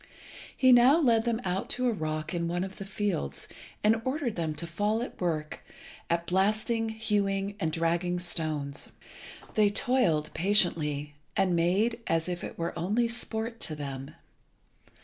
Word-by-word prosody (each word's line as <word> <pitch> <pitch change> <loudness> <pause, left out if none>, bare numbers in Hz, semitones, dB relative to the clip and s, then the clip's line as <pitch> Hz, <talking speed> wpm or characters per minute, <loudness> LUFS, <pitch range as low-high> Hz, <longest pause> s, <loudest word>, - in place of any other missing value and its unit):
He 260 -1 +6
now 250 +6 +7
led 235 -7 +3
them 235 -1 +1
out 185 +1 -2
to 255 - 0
a 240 - +2
rock 155 -2 -3
in 170 -1 -1
one 175 +1 -1
of 190 0 -7
the 195 - -6
fields, 190 - -2 0.4
and 220 +1 +4
ordered 260 -3 -1
them 160 -3 -2
to 170 - -3
fall 205 +6 0
to 245 - -3
work 155 -4 -2 0.5
at 170 0 +1
blasting, 215 +5 +1
hewing, 205 -2 -1
and 160 -5 0
dragging 170 +2 0
stones. 155 -5 -2 0.6
They 210 -2 +4
toiled 200 -9 +2
patiently, 160 -7 +1 0.2
and 185 -2 +3
made 195 +8 +2
as 165 0 +1
if 175 -1 -3
it - - -6
were 170 0 -2
only 210 +8 +1
sport 230 -1 -2
to 155 - -2
them. 140 0 -6
190 Hz, 155 wpm, -29 LUFS, 165-220 Hz, 0.6 s, now